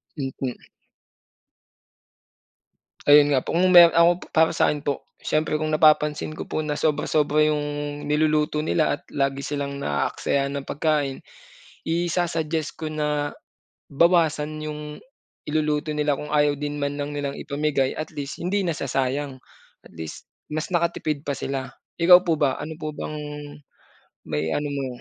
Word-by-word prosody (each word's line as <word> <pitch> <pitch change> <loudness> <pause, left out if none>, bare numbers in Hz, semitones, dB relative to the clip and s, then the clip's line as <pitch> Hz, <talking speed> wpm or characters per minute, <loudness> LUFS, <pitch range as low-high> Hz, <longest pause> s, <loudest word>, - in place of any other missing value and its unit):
Mm. 135 -3 -4 2.5
Ayun 145 0 +7
nga 130 - 0
po. - - -3
Kung 185 +2 +3
meron 175 -2 +9
ako, 170 +1 +6 0.2
para 160 0 +5
sa'kin 150 -1 +1
po, 140 -1 -3 0.2
siyempre 155 0 0
kung 155 0 -1
napapansin 155 0 +3
ko - - -7
po 155 - -1
na 150 - -1
sobra-sobra 150 0 +2
yung 150 -1 +1 0.5
niluluto 150 0 +1
nila 155 0 +1
at - - -25
lagi 140 0 0
silang 140 -1 -3
naaaksaya 140 - -1
ng 140 -1 -5
pagkain, 145 -3 -1 0.6
isa-suggest 165 -2 -1
ko 155 - -2
na 150 -1 -2 0.6
bawasan 155 -1 +2
yung 150 0 -5 0.7
iluluto 150 0 0
nila 150 -1 0
kung 150 0 -7
ayaw 145 -1 +3
din 145 0 -3
man 140 0 -2
lang 145 0 -3
nilang 140 -1 -3
ipamigay 140 -2 -1
at 155 - -5
least 145 +2 -6
hindi 195 +3 0
nasasayang. 135 -3 -2 0.5
At - - -16
least, 80 -1 -8 0.2
mas 155 +1 -3
nakatipid 165 -4 0
pa 140 - -1
sila. 135 -1 -4 0.3
Ikaw 180 +1 +8
po 165 -2 +2
ba? 135 -3 +2
Ano 155 +2 -6
po 155 0 -4
bang 150 +1 -6 1.1
maiano 80 - -1
mo? 140 -2 -2
150 Hz, 140 wpm, -24 LUFS, 140-155 Hz, 2.5 s, meron